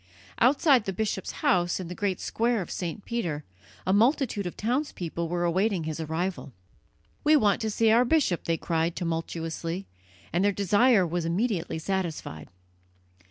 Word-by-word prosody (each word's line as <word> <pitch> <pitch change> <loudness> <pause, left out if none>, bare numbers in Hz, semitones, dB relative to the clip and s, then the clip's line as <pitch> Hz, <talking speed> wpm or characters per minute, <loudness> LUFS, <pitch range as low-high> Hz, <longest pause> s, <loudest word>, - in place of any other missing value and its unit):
Outside 265 -1 +4
the 195 - -2
bishop's 205 -1 -2
house, 175 0 +2
in 185 - -5
the 175 - -6
great 190 0 -1
square 230 -3 0
of - - -11
St. 180 +3 -4
Peter, 170 -11 -2 0.4
a 190 - +2
multitude 230 - +2
of 175 - -7
townspeople 210 - -2
were 175 0 -1
awaiting 185 +1 +1
his 155 0 -4
arrival. 160 -1 -3 0.7
"We 305 +1 +5
want 210 -9 +3
to 220 - -1
see 220 +1 +3
our 235 +2 +5
bishop," 250 - +1
they 165 -1 +1
cried 165 0 -1
tumultuously, 165 +1 -3 0.5
and 175 +3 +2
their 205 - +4
desire 205 +2 +4
was 175 +1 -2
immediately 175 -1 -1
satisfied. 165 - -4
185 Hz, 155 wpm, -27 LUFS, 170-220 Hz, 0.7 s, We